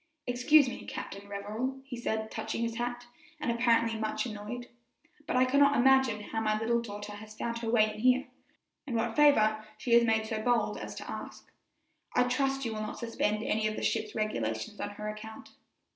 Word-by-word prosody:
"Excuse 255 +4 +5
me, 250 - -5
Captain 200 +1 -7
Revell," 215 +7 -3
he 270 -2 -7
said, 220 -2 -2
touching 235 - -3
his 230 -1 -2
hat, 245 0 -3 0.3
and 240 - 0
apparently 230 -1 +2
much 215 +2 -1
annoyed, 235 +2 -6 0.6
"but - - -1
I 255 0 +5
cannot 280 +2 +4
imagine 260 -3 +4
how 225 +1 -3
my 215 -1 +1
little 235 +1 +1
daughter 205 -2 -7
has 215 +1 -11
found 235 0 -3
her 230 -1 -3
way 215 -2 +3
in 215 - -9
here, 255 +3 +4 0.6
or 245 - -2
what 225 0 0
favor 215 -8 +5
she 235 +2 -1
has 235 0 +7
made 220 -1 +2
so 220 0 -3
bold 240 +1 +1
as - - -7
to - - -8
ask. - - -8 0.6
I 250 - +5
trust 270 +2 0
you 225 - -2
will 215 - -4
not 215 - -5
suspend 215 -2 -1
any 215 -1 +1
of 215 - -2
the - - -5
ship's 215 -1 -1
regulations 115 - -2
on - - -2
her 210 +1 -7
account." 215 +1 -8
225 Hz, 195 wpm, -30 LUFS, 215-245 Hz, 0.6 s, has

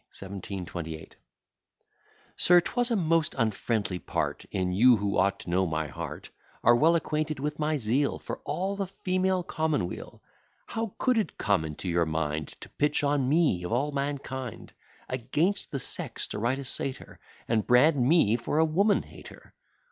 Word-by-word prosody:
1728 90 -4 -6 1.2
SIR, 175 0 +5
'twas 245 +7 0
a 235 - +1
most 165 -4 +1
unfriendly 110 -4 -1
part - - -3
In 95 -2 -1
you, 120 +6 +6
who 100 -1 -1
ought 100 +1 +2
to - - -9
know 95 +1 +2
my 80 -1 -1
heart, 75 - -7 0.3
Are 120 - +6
well 160 +7 +4
acquainted 155 -2 -1
with 150 +2 -3
my 155 0 +1
zeal 130 +4 +1
For - - -6
all 190 +3 -2
the 195 -1 -2
female 185 0 0
commonweal 155 - -3 0.4
How 225 -3 -4
could 250 -3 +2
it 215 - -3
come 100 -6 +1
into 80 +4 -5
your 85 -1 +1
mind 80 -1 -2
To - - -9
pitch 150 0 0
on 140 -2 +1
me, 145 - +2
of 90 - -4
all 135 +6 +1
mankind, 140 -4 -4 0.3
Against 145 - -1
the 140 - -3
sex 130 - -2
to - - -4
write 120 +5 +1
a 140 - -5
satire, 130 0 -3 0.3
And 110 -2 0
brand 140 +5 +5
me 125 -6 +4
for 120 +5 -2
a 160 - +5
woman 200 +7 +2
hater? - - -14
130 Hz, 165 wpm, -28 LUFS, 100-160 Hz, 1.2 s, you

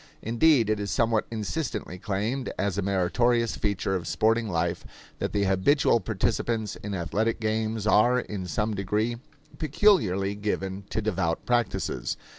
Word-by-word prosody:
Indeed, 115 0 +3
it 110 - 0
is 100 -1 -3
somewhat 115 -2 +1
insistently 110 - -4
claimed 110 +7 -2
as 100 -1 0
a 100 - 0
meritorious 110 +5 +1
feature 100 -2 -1
of 90 -3 -2
sporting 115 +2 +1
life 85 0 -1 0.4
that - - -2
the 100 -1 +1
habitual 100 +7 +3
participants 110 0 -1
in 100 -1 -5
athletic 105 +7 -1
games 110 -1 -1
are 120 +4 +4
in 100 -6 -5
some 105 +5 -1
degree 105 +4 -1 0.4
peculiarly 130 - +2
given 100 -2 -3
to 110 +1 -2
devout 90 -6 -1
practices. 120 -3 -1
105 Hz, 140 wpm, -27 LUFS, 95-115 Hz, 0.4 s, are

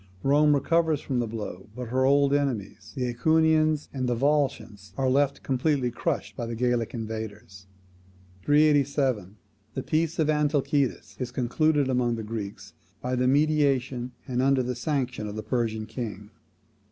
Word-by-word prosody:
Rome 145 +2 +4
recovers 160 +1 +2
from 130 -4 -2
the 120 - -1
blow, 105 -4 -6
but 125 -2 -6
her 130 +2 +2
old 140 +1 +4
enemies, 115 -7 -2
the 130 - -2
AEquians 155 +2 +3
and 130 -2 -2
Volscians, 120 -6 -1
are 135 -1 +1
left 140 +1 +1
completely 130 -1 0
crushed - - -3
by 120 - -4
the 115 - -4
Gallic 120 -1 0
invaders. 110 -4 -7 0.8
387. 140 -8 +2 0.4
The 130 - -3
peace 160 0 0
of 155 - +2
Antalcidas 145 -2 0
is 125 -2 -3
concluded 140 +4 +1
among 125 -2 +1
the 110 - -5
Greeks 100 -2 -6 0.3
by 125 +2 -2
the 125 0 +1
mediation, 135 -4 +1
and 125 -1 0
under 135 -1 +3
the 125 +1 -2
sanction, 125 -4 -2
of 105 - -6
the 110 - -5
Persian 110 -1 -1
king. 105 -3 -6
130 Hz, 150 wpm, -26 LUFS, 115-145 Hz, 0.8 s, Rome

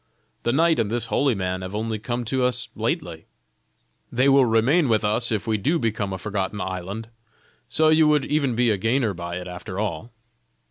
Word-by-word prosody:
The 120 - 0
knight 160 +3 +3
and 110 -3 +1
this 115 0 -1
holy 140 -4 +2
man 95 -1 -2
have 95 +2 -6
only 110 0 -2
come 120 +2 -3
to 130 +3 0
as 125 0 -3
lately. 110 - -3 0.8
They 130 +3 +2
will 135 -1 +6
remain 125 +7 +3
with 110 -2 +2
us 115 +3 0
if 110 -3 -1
we 110 -2 +1
do 155 - +1
become 110 -6 -1
a 95 - -3
forgotten 100 +1 -3
island; 95 +4 -5 0.6
so 155 +6 +4
you 155 0 +5
would 150 -3 +3
even 140 -5 0
be 120 -1 +3
a 105 - +1
gainer 115 +2 +1
by 85 -1 -6
it 90 0 -6
after 90 +1 -7
all." 110 +2 -3
115 Hz, 195 wpm, -23 LUFS, 100-130 Hz, 0.8 s, will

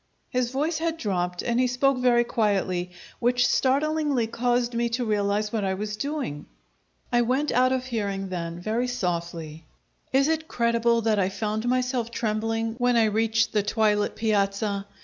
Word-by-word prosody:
His 250 -1 0
voice 300 +5 -1
had 330 0 -1
dropped, 180 - -2
and 240 0 0
he 255 - +3
spoke 255 +1 +1
very 245 -1 +4
quietly, 195 -6 0 0.3
which 245 +1 +2
startlingly 285 -1 +1
caused 240 +1 0
me 235 0 0
to 240 +1 -1
realize 210 0 0
what 220 -3 0
I 190 -1 0
was 210 +2 -4
doing. 270 - -4 0.7
I 240 - +5
went 260 +5 +1
out 255 +1 +3
of 260 -1 -1
hearing 200 -5 -3
then, 170 -2 -4
very 225 +7 -1
softly. 170 -7 -4 0.4
Is 275 +2 +3
it 320 0 -1
creible 235 -1 +2
that 215 -2 +2
I 190 -1 +2
found 215 +3 -2
myself 250 -2 0
trembling 225 0 -1
when 245 -1 +3
I 230 - +5
reached 225 +1 +1
the 210 - +3
twilit 210 0 +1
piazza? 200 -1 0
230 Hz, 165 wpm, -25 LUFS, 205-250 Hz, 0.7 s, I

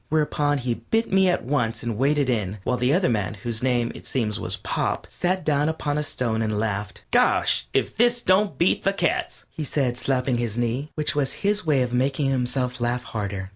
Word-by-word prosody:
Whereupon 150 -1 +1
he 125 -2 -1
bit 225 - -1
at - - -9
me 190 -1 +5
once 120 -4 -1
and 115 -2 -2
waded 140 +3 +2
in, 105 -5 -1
while 125 - 0
the 125 +1 +1
other 180 +4 +3
man, 105 -3 -1
whose 110 +2 -4
name, 120 -2 +1
it - - -11
seems, 110 -4 -2
was - - 0
Pop, - - -2
sat 185 +1 -1
down 150 0 +2
upon 150 -2 -1
a - - +1
stone 125 -7 -1
and 110 -1 -1
laughed. 105 -2 -3
"Gosh! - - +3
If - - 0
this 240 +1 +3
don't 185 -5 +3
beat 170 - +2
the 195 - +1
cats," 175 -4 -1
he 155 - -5
said, 130 -4 0
slapping 125 -2 0
his 115 -2 -2
knee, 120 +5 -1
which 150 -1 -1
was 140 -2 0
his 205 -3 +1
way 140 -4 +3
of 125 -1 -4
making 135 +2 +1
himself 125 -1 -1
laugh 120 +1 0
harder. 100 -5 -4
130 Hz, 210 wpm, -24 LUFS, 115-150 Hz, -, me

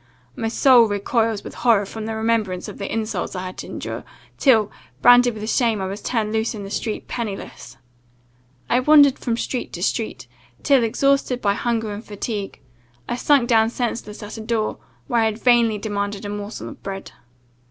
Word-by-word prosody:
My 225 - -2
soul 240 +1 +6
recoils 215 +1 0
with - - -8
horror 225 -5 +3
from 220 +2 -6
the 225 - -3
remembrance 220 -5 0
of - - -9
the 200 - -4
insults 220 -2 -3
I 185 0 -4
had 185 - -7
to - - -6
endure, - - -6 0.4
till, 225 -7 +4 0.3
branded 245 -1 +6
with 215 0 -6
shame, 230 -3 +1
I 190 - -2
was 195 +2 -5
turned 220 -3 -1
loose 220 +1 0
in 205 - -6
the 195 - -8
street, 220 0 -3
pennyless. 220 -5 -6 0.9
I 245 - +3
wandered 285 0 +6
from 235 -2 -1
street 250 +1 -3
to - - -4
street, - - -2 0.4
till, 275 -4 +4
exhausted 270 +2 +1
by 200 -4 +1
hunger 225 -1 -1
and 205 +2 -7
fatigue, 205 -1 -5 0.5
I - - -2
sunk 260 0 +3
down 225 -2 +4
senseless 230 -3 -4
at 210 +2 -8
a - - -5
door, 220 -1 -2 0.3
where 240 -4 +1
I - - +3
had 220 -1 -1
vainly 235 -2 +3
demanded 205 -1 -3
a - - -4
morsel 205 +1 -6
of - - -12
bread. 195 0 -6
220 Hz, 185 wpm, -22 LUFS, 205-240 Hz, 0.9 s, soul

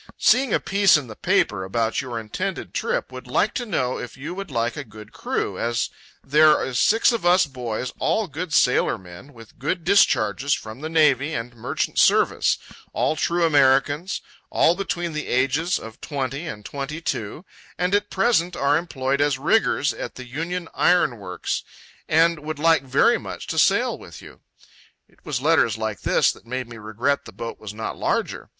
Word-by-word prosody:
"Seeing 255 -1 +3
a - - +3
piece 195 -3 +4
in 145 - -5
the 110 -3 -10
paper 95 -2 +1
about 115 +6 -1
your 125 -3 -5
intended 110 -1 -5
trip, - - -2
would 130 0 -9
like 195 +12 +1
to 245 -2 -3
know 130 -11 -1
if 125 - -8
you 140 +6 -6
would 195 0 -6
like 120 -2 -1
a 150 - -5
good 105 -3 -13
crew, - - -3
as 120 0 -1 0.3
there 150 +2 +4
is 125 -2 -2
six 225 +3 +4
of 230 -5 -2
us 180 +1 +5
boys 125 -3 -5
all 220 - +1
good 160 +1 -6
sailor 125 -4 +3
men, 90 +8 -13
with 115 -4 -16
good 165 +6 -2
discharges 140 - +3
from 110 +4 -9
the 155 - -4
Navy 155 -2 +3
and 120 +1 -5
Merchant 110 - -2
Service, - - +3 0.4
all - - +1
true 170 +3 +1
Americans, 145 +3 +2 0.3
all 165 - +4
between 175 -3 -3
the 150 0 -4
ages 135 +8 +1
of 110 0 -11
20 140 +2 -4
and 105 -5 -7
22, 140 - -4 0.3
and 180 +1 0
at 205 0 +1
present 190 -4 +1
are 145 +2 +2
employed 140 -5 -2
as 145 -2 +2
riggers 145 - +2
at - - -7
the 130 - -8
Union 165 +7 -4
Iron 160 -10 +2
Works, 90 -3 -3 0.5
and 165 +1 +3
would 155 +1 -5
like 165 -1 +4
very 135 +1 +3
much - - -7
to - - -1
sail - - +3
with - - -12
you."—It - - -20
was 130 -3 -3
letters 150 -9 +3
like 110 -3 -4
this - - +3
that - - -16
made 130 0 -4
me 115 -1 -10
regret 115 +6 -1
the - - -10
boat 115 0 -7
was 105 -2 -7
not 110 +1 -5
larger. - - -2
140 Hz, 180 wpm, -23 LUFS, 120-165 Hz, 0.5 s, us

